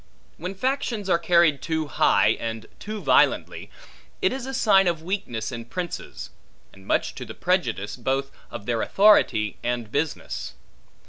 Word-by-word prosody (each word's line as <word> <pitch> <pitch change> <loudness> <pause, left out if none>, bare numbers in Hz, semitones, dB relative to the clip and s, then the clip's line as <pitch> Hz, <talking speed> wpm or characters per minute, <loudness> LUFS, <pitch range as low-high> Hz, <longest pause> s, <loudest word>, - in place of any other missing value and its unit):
When 180 +4 -5
factions 230 -3 -1
are 170 - +4
carried 170 -4 +3
too 160 -1 -1
high 105 -7 +3
and 115 -1 -4
too 215 0 -6
violently, - - +2 0.5
it 375 - +1
is 265 -1 -5
a 270 - -5
sign 195 -6 +4
of 165 -2 -1
weakness 135 - -3
in 115 -1 -6
princes; 175 +7 -6 0.4
and 95 0 -17
much - - +1
to - - -7
the - - -9
prejudice, 120 - -1
both 135 +2 -1 0.2
of 100 - -8
their 115 -1 0
authority 115 - +4
and 120 -3 -3
business. 150 +1 -3
160 Hz, 150 wpm, -24 LUFS, 115-195 Hz, 0.5 s, are